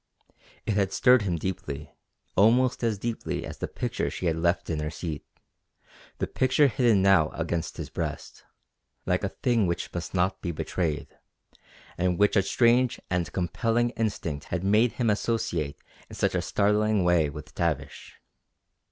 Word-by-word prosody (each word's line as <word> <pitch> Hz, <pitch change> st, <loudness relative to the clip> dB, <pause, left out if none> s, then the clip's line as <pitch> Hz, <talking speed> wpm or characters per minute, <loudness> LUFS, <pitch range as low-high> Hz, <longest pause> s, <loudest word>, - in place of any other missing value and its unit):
It 105 Hz, -, 0 dB
had 100 Hz, -2 st, +1 dB
stirred 125 Hz, -1 st, +5 dB
him 95 Hz, -4 st, -1 dB
deeply, 75 Hz, -4 st, -5 dB, 0.4 s
almost 120 Hz, +5 st, +4 dB
as 115 Hz, -3 st, +1 dB
deeply 115 Hz, +3 st, -3 dB
as -, -, -8 dB
the -, -, -2 dB
picture -, -, -2 dB
she -, -, -5 dB
had 80 Hz, -2 st, +2 dB
left 85 Hz, +2 st, 0 dB
in 80 Hz, -2 st, -2 dB
her 75 Hz, 0 st, -2 dB
seat 80 Hz, -1 st, -5 dB, 0.9 s
the -, -, -1 dB
picture 130 Hz, +3 st, +2 dB
hidden 120 Hz, -7 st, +3 dB
now 95 Hz, -6 st, +5 dB
against 85 Hz, 0 st, -3 dB
his -, -, -6 dB
breast -, -, -5 dB, 0.6 s
like 90 Hz, +2 st, 0 dB
a 95 Hz, -, 0 dB
thing 115 Hz, -2 st, +1 dB
which 85 Hz, -, -3 dB
must 85 Hz, +2 st, -5 dB
not 95 Hz, +1 st, +1 dB
be 85 Hz, -, -2 dB
betrayed, 80 Hz, 0 st, -3 dB, 0.8 s
and 90 Hz, -1 st, +1 dB
which 105 Hz, 0 st, +3 dB
a 100 Hz, -, +5 dB
strange 120 Hz, +5 st, +3 dB
and 90 Hz, -2 st, 0 dB
compelling 115 Hz, +6 st, 0 dB
instinct 95 Hz, -, -3 dB
had 90 Hz, -1 st, -3 dB
made 105 Hz, +4 st, +3 dB
him 115 Hz, -4 st, +1 dB
associate 90 Hz, -9 st, -1 dB, 0.3 s
in -, -, -9 dB
such -, -, 0 dB
a -, -, +1 dB
startling 105 Hz, 0 st, +2 dB
way 85 Hz, -4 st, +3 dB
with 75 Hz, +1 st, -10 dB
Tavish. 75 Hz, -5 st, -3 dB
95 Hz, 160 wpm, -27 LUFS, 85-115 Hz, 0.9 s, stirred